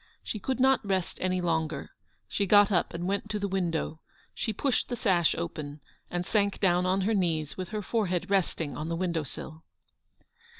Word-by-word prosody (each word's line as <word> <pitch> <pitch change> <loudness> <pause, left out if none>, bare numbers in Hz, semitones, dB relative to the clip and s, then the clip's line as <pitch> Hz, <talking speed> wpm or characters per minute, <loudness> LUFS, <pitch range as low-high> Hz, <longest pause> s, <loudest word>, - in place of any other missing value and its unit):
She 215 - -4
could 260 +6 -2
not 265 -1 +4
rest 190 -3 -1
any 185 0 +1
longer; 160 -4 -1 0.4
she 200 - -1
got 205 +1 +6
up 175 -3 +2
and 170 +1 -4
went 200 +2 -1
to 215 - -1
the 200 -1 -1
window; 170 -4 -1 0.3
she 220 - -2
pushed 250 +4 0
the 245 - -1
sash 185 -7 +3
open, 155 -3 -5 0.3
and 175 0 -2
sank 200 -1 +1
down 180 -2 +3
on 190 +1 +2
her 215 +4 +2
knees 165 -7 0
with 185 -2 -5
her 215 -1 -3
forehead 185 -4 0
resting 170 -7 0
on 155 +4 -4
the 170 - -1
window 170 -2 0
sill. 155 +3 -8
185 Hz, 185 wpm, -29 LUFS, 165-205 Hz, 0.4 s, got